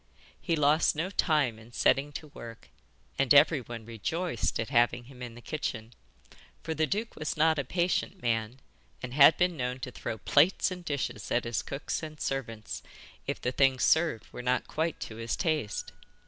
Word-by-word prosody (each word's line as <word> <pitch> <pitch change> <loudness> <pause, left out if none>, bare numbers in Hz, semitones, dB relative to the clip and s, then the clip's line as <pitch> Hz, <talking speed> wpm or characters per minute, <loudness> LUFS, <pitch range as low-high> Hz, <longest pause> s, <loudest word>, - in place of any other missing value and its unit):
He 170 - 0
lost 150 +1 +3
no 165 +5 -2
time 145 - +1
in 115 +2 -16
setting 140 +4 +2
to 155 0 -7
work, 115 -5 -11 0.5
and 135 -2 +1
everyone 130 -6 +3
rejoiced 120 - -2
at 115 - -2
having 120 -2 +3
him 125 0 -14
in 120 -2 -7
the 120 - -13
kitchen, 120 -6 -4 0.7
for 160 - -2
the 155 0 +1
duke 215 +6 -2
was 155 0 -3
not 160 0 +3
a - - 0
patient 180 +5 -1
man, 115 -1 -1 0.4
and 125 -1 -5
had 140 +3 +7
been 180 -1 +2
known 125 -2 -3
to 130 - -5
throw 110 - -5
plates 160 - +3
and 180 -1 -6
dishes 145 -5 -3
at 120 - +1
his 115 -1 -1
cooks 135 - -4
and 155 -1 -8
servants 115 -5 -4 0.5
if - - -2
the 125 - -1
things 135 -1 +3
served 160 -8 +3
were - - -6
not 125 +1 0
quite 160 +1 -2
to 110 - -6
his 115 0 -2
taste. 155 - -1
135 Hz, 180 wpm, -29 LUFS, 120-160 Hz, 0.7 s, had